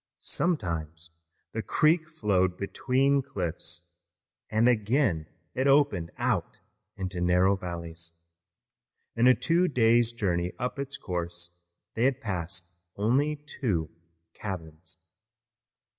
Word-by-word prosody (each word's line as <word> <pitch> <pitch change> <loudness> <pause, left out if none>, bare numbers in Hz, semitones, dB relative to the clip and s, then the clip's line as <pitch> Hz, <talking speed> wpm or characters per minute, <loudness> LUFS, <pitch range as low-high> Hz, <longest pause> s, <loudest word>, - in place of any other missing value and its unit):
Sometimes 85 - -2 0.4
the 115 - -2
creek 155 - +2
flowed 95 - +1
between 135 +7 +2
cliffs, 85 - -4 0.7
and 110 +2 +3
again 110 - +2 0.3
it 130 +2 +1
opened 135 - +4
out - - -1 0.4
into 95 -2 -3
narrow 90 +2 +4
valleys. 85 -2 -5 1.0
In 115 +2 +4
a 130 - +8
two 170 +2 +2
days' 120 -4 +4
journey 90 -6 -1
up 125 +3 -3
its 140 +1 -3
course 85 -3 -4 0.4
they 120 +4 +4
passed 95 -8 -4 0.3
only 130 +9 +2
two 95 - -1 0.4
cabins. 80 -5 -6
100 Hz, 100 wpm, -28 LUFS, 85-130 Hz, 1.0 s, a